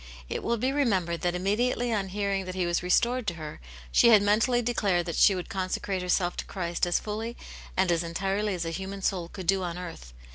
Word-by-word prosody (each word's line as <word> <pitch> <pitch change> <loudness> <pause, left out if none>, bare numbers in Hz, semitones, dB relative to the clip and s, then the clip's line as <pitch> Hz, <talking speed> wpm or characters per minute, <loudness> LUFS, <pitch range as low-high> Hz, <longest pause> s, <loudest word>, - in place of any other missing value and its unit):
It - - -3
will 235 0 0
be 255 +4 0
remembered 190 -12 +1
that 175 0 0
immediately 235 +6 0
on 200 -3 0
hearing 195 -1 -1
that 185 0 -6
he 185 -1 0
was 175 0 0
restored 235 +7 +2
to 175 - +1
her, 155 - -8 0.3
she - - +6
had 215 -3 +7
mentally 220 +4 +3
declared 200 -7 +1
that 170 -3 -3
she 200 - +5
would 180 - -4
consecrate 190 0 -2
herself 180 0 +1
to - - -3
Christ 175 -2 -2
as 175 - +2
fully 220 +3 -5 0.4
and 185 -1 +3
as 165 -1 +2
entirely 195 +4 -1
as 170 -2 -3
a 165 - -2
human 190 +3 -5
soul 180 -4 0
could 185 +1 -8
do 190 +2 +3
on 175 -1 -3
earth. 170 - -8
190 Hz, 220 wpm, -28 LUFS, 175-210 Hz, 0.4 s, had